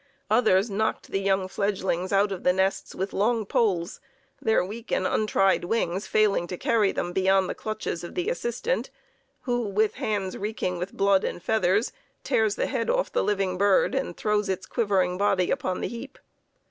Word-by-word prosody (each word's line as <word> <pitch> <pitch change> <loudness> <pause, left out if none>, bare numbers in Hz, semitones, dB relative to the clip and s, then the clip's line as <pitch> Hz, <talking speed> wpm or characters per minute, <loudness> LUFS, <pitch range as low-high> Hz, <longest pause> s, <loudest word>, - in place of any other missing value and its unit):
Others 215 -3 +4
knocked 220 +2 -1
the 195 - 0
young 195 -1 +1
fledglings 190 -2 -1
out 200 +1 +3
of 190 - -4
the 180 - +5
nests 190 +1 -1
with 190 +1 -3
long 220 +2 +1
poles, 195 -5 0 0.4
their 220 -4 +2
weak 225 +5 -8
and 185 - +1
untried 195 -2 +2
wings 190 -2 -1
failing 205 -5 +2
to 180 - -5
carry 215 -1 +2
them 175 - -3
beyond 190 0 +3
the - - -2
clutches 215 -5 -4
of 175 - -8
the 360 +2 -1
assistant, 485 +1 -2 0.5
who, 245 -3 -1
with 210 +2 +1
hands 200 -3 -1
reeking 200 -4 -3
with 180 +2 -4
blood 195 -1 +2
and 175 - -4
feathers, 215 0 +2 0.3
tears 220 -2 +1
the - - 0
head - - -2
off - - +1
the - - +1
living 195 -3 0
bird, 200 +3 +3
and 265 -10 -2
throws 210 -1 0
its 190 0 -2
quivering 190 -5 0
body 195 -3 +2
upon 185 - -1
the - - -1
heap. 245 +4 -8
200 Hz, 180 wpm, -26 LUFS, 185-220 Hz, 0.5 s, the